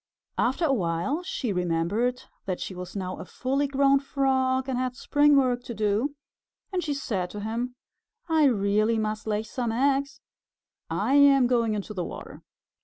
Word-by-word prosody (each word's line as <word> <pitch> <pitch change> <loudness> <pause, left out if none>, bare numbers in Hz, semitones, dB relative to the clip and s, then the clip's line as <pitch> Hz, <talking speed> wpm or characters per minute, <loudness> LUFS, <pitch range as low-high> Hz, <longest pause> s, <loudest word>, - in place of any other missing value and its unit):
After 265 +8 +1
a 280 - +2
while 180 - -1
she 265 - -3
remembered 180 +8 0 0.2
that 185 -2 -2
she - - -5
was 180 +1 -8
now 185 -2 -4
a - - -7
fully 275 +3 -1
grown 275 0 +3
Frog 265 -2 0
and 265 - -1
had 255 0 -2
spring 290 +2 +3
work 250 -3 +2
to 235 - -6
do, 215 +7 0 0.6
and 360 -1 0
she 295 -2 -2
said 195 -10 -2
to 210 - -7
him, 235 +4 -3 0.5
"I 320 -2 +4
really 215 -2 +2
must 215 0 -2
lay 210 0 0
some 235 +1 -3
eggs. 275 +4 +1 0.7
I 270 - 0
am 280 -2 +6
going 235 -3 +2
into 210 +1 -5
the 180 -3 -3
water." - - -8
245 Hz, 170 wpm, -26 LUFS, 210-275 Hz, 0.7 s, am